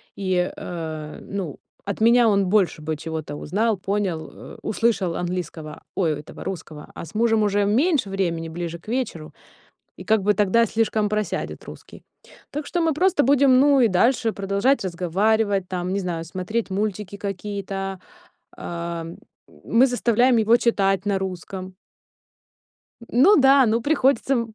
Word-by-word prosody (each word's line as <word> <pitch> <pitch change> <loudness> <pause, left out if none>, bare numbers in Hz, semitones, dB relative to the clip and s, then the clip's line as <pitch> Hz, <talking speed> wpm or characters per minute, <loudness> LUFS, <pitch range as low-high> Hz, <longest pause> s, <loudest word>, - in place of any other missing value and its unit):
И, 185 -2 0
э, 160 -3 -6
ну 190 -7 -5 0.3
от 200 +1 -4
меня 235 +1 +5
он 200 -3 +2
больше 185 -5 +2
бы 155 0 -3
чего-то 155 -1 -5
узнал, 220 +5 0
понял, 190 -5 -2
э, - - -12
услышал 210 -6 0
английского, 175 -3 -5
ой, 160 -6 0
этого 150 - -10
русского, 160 -5 -7
а - - -7
с 165 - -15
мужем 225 -1 +2
уже 205 0 +2
меньше 255 - +2
времени 170 -4 -2
ближе 170 0 -5
к 170 - -14
вечеру, 220 -11 -3 0.6
и - - -10
как 220 -1 +2
бы 210 +2 +3
тогда 210 +3 +3
слишком 220 -1 0
просядет 210 0 -3
русский. - - -12 0.5
Так 295 +1 -5
что 350 - -1
мы 325 -1 +2
просто 335 -1 +2
будем 270 -1 +5
ну 285 -1 +5
и 240 - +5
дальше 225 +3 +2
продолжать 200 +7 +1
разговаривать, 195 +3 0
там, 180 0 -3
не 200 - 0
знаю, 170 -3 -4
смотреть 185 +7 -3
мультики 200 0 -3
какие-то, 195 -1 -5 0.5
а, 170 -1 -5 0.6
мы 240 +3 +4
заставляем 245 0 +2
его 225 +1 +4
читать 195 -5 +1
на 200 -1 0
русском. 185 0 -6 1.4
Ну 300 - +6
да, 270 -2 +6
ну 225 +1 +1
приходится 275 -1 +2
м 230 -3 -2
200 Hz, 150 wpm, -23 LUFS, 180-230 Hz, 1.4 s, Ну